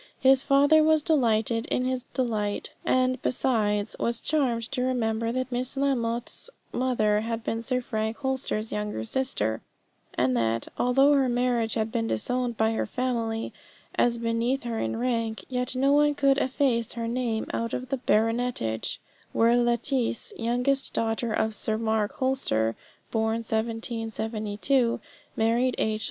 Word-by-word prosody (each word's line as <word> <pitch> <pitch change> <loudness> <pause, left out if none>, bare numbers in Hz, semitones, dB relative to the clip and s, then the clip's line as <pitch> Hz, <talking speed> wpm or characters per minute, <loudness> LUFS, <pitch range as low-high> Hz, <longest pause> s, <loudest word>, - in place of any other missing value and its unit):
His 265 0 +5
father 285 +3 +5
was 310 -1 +4
delighted 230 -6 +2
in 250 - 0
his 255 -1 -2
delight, 215 -7 -2
and, 255 -1 +1
besides, 215 -5 0
was 235 0 0
charmed 255 -7 +1
to 265 -2 -1
remember 230 -3 0
that 255 +1 -2
Miss 255 +2 -2
Lamotte's 240 - -1 0.2
mother 220 -5 +2
had 225 0 -3
been 225 +1 -2
Sir 250 +2 -1
Frank 220 -2 -2
Holster's 265 -5 -2
younger 210 - -3
sister, 110 - -1 0.5
and 125 0 +2
that, 115 -1 0
although 270 +4 +4
her 270 -2 +3
marriage 240 -2 +1
had 220 -1 -1
been 115 - -1
disowned 240 - -1
by 220 0 +2
her 225 - -1
family, 230 -3 -2 0.4
as 240 -1 +2
beneath 230 +3 0
her 230 -2 -3
in - - -2
rank, 230 -4 -1
yet 250 0 -2
no 270 +2 +3
one 295 0 +4
could 275 -1 +3
efface 255 -4 +1
her 230 -1 -3
name 235 -2 -1
out 230 0 -2
of 255 0 -4
the 270 - 0
Baronetage, 225 - 0 0.4
where 230 +1 +4
Lettice, 240 0 0
youngest 250 +4 0
daughter 225 +1 0
of 220 0 0
Sir 215 +1 -1
Mark 220 -2 0
Holster, 115 - 0 0.4
born 225 0 0
1772, 225 +1 -1 0.4
married 235 +3 +2
H. 215 0 0
235 Hz, 145 wpm, -27 LUFS, 220-255 Hz, 0.5 s, His